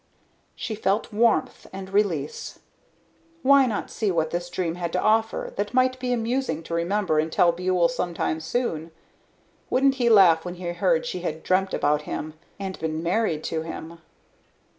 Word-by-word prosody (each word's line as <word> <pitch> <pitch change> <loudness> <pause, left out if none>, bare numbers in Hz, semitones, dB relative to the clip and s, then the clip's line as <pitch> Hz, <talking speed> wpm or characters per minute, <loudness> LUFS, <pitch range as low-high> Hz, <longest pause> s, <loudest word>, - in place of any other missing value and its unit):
She 225 - -4
felt 210 +1 -1
warmth 230 +1 +1
and 190 0 -8
release. 175 -9 -1 0.9
Why 275 0 +6
not 215 -4 -3
see 215 - -1
what 160 -3 0
this 175 0 -3
dream 175 -2 -2
had 170 -1 -4
to 180 - +1
offer 220 +2 +1
that 205 +4 -2
might 255 0 +3
be 250 0 -2
amusing 240 - -1
to 165 - -7
remember 170 -1 +1
and 160 +1 -1
tell 170 +1 +4
Buhl 180 0 +1
sometime 170 -1 -2
soon. 165 -4 -2 0.8
Wouldn't 270 +1 +3
he 240 - +4
laugh 180 -7 +6
when 180 0 -6
he 180 0 -7
heard - - +1
she - - -3
had - - -4
dreamed 190 +1 +1
about 150 +1 +1
him? 155 0 -4 0.3
And 190 -1 -5
been 160 0 -3
married 170 -3 0
to 160 - -2
him. 165 +1 -8
185 Hz, 165 wpm, -25 LUFS, 165-225 Hz, 0.9 s, Why